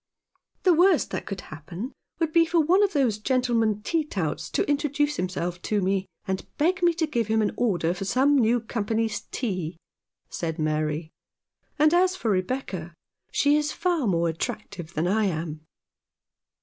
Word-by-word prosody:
"The 365 - +6
worst 350 0 +4
that - - -4
could 195 -3 -4
happen 170 - -7 0.2
would 325 -2 -1
be 335 - +6
for 335 +1 +1
one 345 +6 +4
of 405 -1 +2
those 250 -8 +2
gentlemen 230 -4 +1
tea 330 +4 +1
touts 180 - -3
to - - 0
introduce 290 0 0
him 185 - 0
self 175 -1 -3
to 210 +3 0
me, 190 0 0 0.2
and 190 0 -2
beg 360 +5 +2
me 345 -1 +4
to 330 -1 +1
give 235 -8 -1
him 220 0 +2
an 215 - +2
order 180 -8 +1
for 185 - -5
some 265 +8 +3
new 240 -2 +3
company's 220 0 -1
tea," 185 -9 -3 0.5
said 165 -1 -4
Mary; 155 0 -1 0.3
" - - -46
and 305 +1 +4
as 365 +1 +4
for 230 -12 -1
Rebecca, 185 -4 -2 0.4
she 290 +1 +3
is 300 0 +1
far 335 -7 0
more 170 -3 +2
attractive 175 -1 -5
than 155 - 0
I 215 +3 +2
am." 160 -3 -3
220 Hz, 175 wpm, -26 LUFS, 180-295 Hz, 0.5 s, The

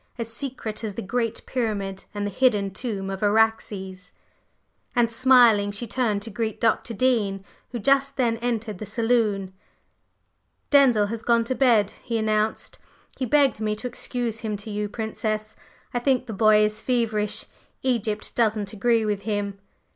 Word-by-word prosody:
"As 230 -1 -4
secret 235 -4 -5
as 210 -3 -4
the - - -4
Great 230 +3 -2
Pyramid 200 -6 -3
and 205 0 -2
the 205 - -3
hidden 205 -4 +2
tomb 195 -2 -4
of 195 - -5
Araxes!" 205 -3 0 0.8
And 235 -1 +3
smiling, 235 -4 +5
she 205 +4 -5
turned 220 -3 0
to 225 - -8
greet 220 0 -3
Dr. 230 0 +1
Dean, 205 -5 +1 0.3
who 245 - -3
just 275 +4 +2
then 235 -3 +1
entered 230 -4 -3
the 215 - -6
saloon. 215 -4 0 1.2
"Denzil 260 -7 +5
has 230 0 -4
gone 235 0 +3
to 235 - -2
bed," 235 -6 +3
he 235 -3 -2
announced. 215 0 -1 0.4
"He 255 - -1
begged 275 -3 +3
me 215 -1 0
to 215 - -8
excuse 240 -2 -3
him 215 -3 -3
to 210 +2 -7
you, 210 0 -2
Princess. 215 0 -3 0.4
I 245 - +1
think 255 0 +1
the 225 - -6
boy 215 +1 +5
is 215 +1 -3
feverish. 220 -4 0 0.4
Egypt 225 -5 -1
doesn't 215 -3 0
agree 225 +1 +2
with 205 -2 -1
him." 200 -1 -3
220 Hz, 160 wpm, -24 LUFS, 205-240 Hz, 1.2 s, smiling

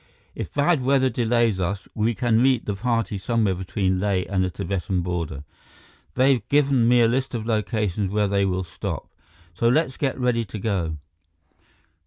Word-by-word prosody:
If - - -6
bad 145 +1 +2
weather 130 0 +2
delays 115 -4 +1
us, 95 +2 -2
we 110 +1 0
can 115 +1 +2
meet 130 -2 +3
the 105 - -1
party 115 -1 -1
somewhere 110 -1 +1
between 95 0 -1
Leh 95 -2 +1
and 95 -1 0
the 90 - 0
Tibetan 95 -1 -2
border. 85 -5 -4 0.7
They've 130 -2 +3
given 140 -4 +3
me 120 0 +5
a 115 - +5
list 130 +2 -1
of 110 -2 -3
locations 105 -3 -1
where 105 +1 +1
they 100 0 +1
will 95 -1 0
stop. 85 - -5 0.5
So 115 - 0
let's 130 +2 +2
get 135 -3 -1
ready 125 -2 +1
to 110 0 -8
go." 95 -7 -2
110 Hz, 170 wpm, -23 LUFS, 95-125 Hz, 0.7 s, me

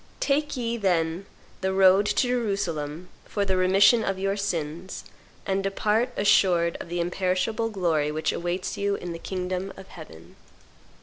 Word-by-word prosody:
Take 295 0 0
ye, 235 -1 -2
then, 175 -2 0 0.3
the 190 0 0
road 195 +1 +5
to 250 - +1
Jerusalem 180 -9 -2 0.2
for 200 -1 -2
the 190 -1 0
remission 195 +5 +5
of 195 -2 -1
your 195 +1 -1
sins, 175 -3 -4 0.4
and 195 0 0
depart 210 +4 0
assured 175 -4 +3
of - - -8
the 175 0 -3
imperishable 185 +6 -1
glory 165 -7 0
which 155 +1 -1
awaits 175 +2 -3
you 200 0 0
in 175 - -6
the 165 - -7
kingdom 185 +1 -4
of 190 - -12
heaven." 85 - -13
190 Hz, 150 wpm, -25 LUFS, 175-200 Hz, 0.4 s, road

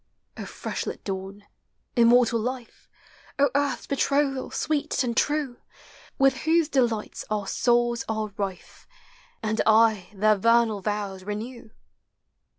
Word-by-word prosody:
O - - -7
fresh - - -5
lit - - -6
dawn! 195 +1 -6 0.5
immortal 235 -1 +4
life! 245 +1 -6 0.5
O 280 -2 +3
Earth's 285 0 0
betrothal, 275 -1 0
sweet 300 -3 -1
and 235 -2 -2
true, 290 -3 0 0.6
With 270 -1 +3
whose 320 +2 +2
delights 235 -7 0
our 210 -2 -1
souls 240 +2 +1
are 215 -2 -3
rife. 195 -3 -6 0.6
And 220 0 0
aye 220 -3 +4
their 215 +1 +3
vernal 230 0 +3
vows 200 -2 -3
renew 220 +4 -6
230 Hz, 120 wpm, -25 LUFS, 210-265 Hz, 0.6 s, immortal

